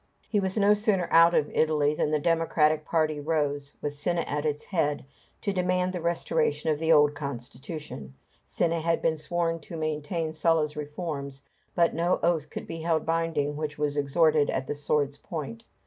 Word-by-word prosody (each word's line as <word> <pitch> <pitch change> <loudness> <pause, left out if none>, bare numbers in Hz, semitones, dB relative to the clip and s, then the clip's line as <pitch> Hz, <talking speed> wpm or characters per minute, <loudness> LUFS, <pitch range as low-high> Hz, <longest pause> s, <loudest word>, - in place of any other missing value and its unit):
] - - -37
He 210 - +3
was 190 +1 -1
no 205 0 +5
sooner 205 -4 +1
out 165 +1 +6
of 150 - +1
Italy 150 -2 +2
than 150 - 0
the 155 - +2
democratic 155 -1 +2
party 155 -2 0
rose, 145 -2 -1
with 145 - -2
Cinna 170 +4 -1
at 150 -2 -2
their 150 -2 +1 0.2
head, 150 -6 0 0.4
to 200 - -1
demand 180 0 0
the 180 - -4
restoration 170 - 0
of 150 - -1
the 165 0 +1
old 150 -2 +6
constitution. 140 - -7 0.3
Cinna 170 -1 0
had 165 +1 0
been 160 - +2
sworn 165 +1 -1
to 165 +2 -9
maintain 155 +1 -2
Sulla's 155 -1 +1
reforms, 145 -2 -5 0.3
but 170 -1 +3
no 170 +2 +1
oath 165 -3 +1
could - - -6
be 165 - -6
held 160 -1 0
binding 165 -3 0
which 150 0 -4
was 150 -1 -1
extorted 150 +1 +3
at 130 - -1
the 145 - -3
sword's 145 -1 0
point. 135 -9 -6
155 Hz, 180 wpm, -27 LUFS, 145-170 Hz, 0.4 s, out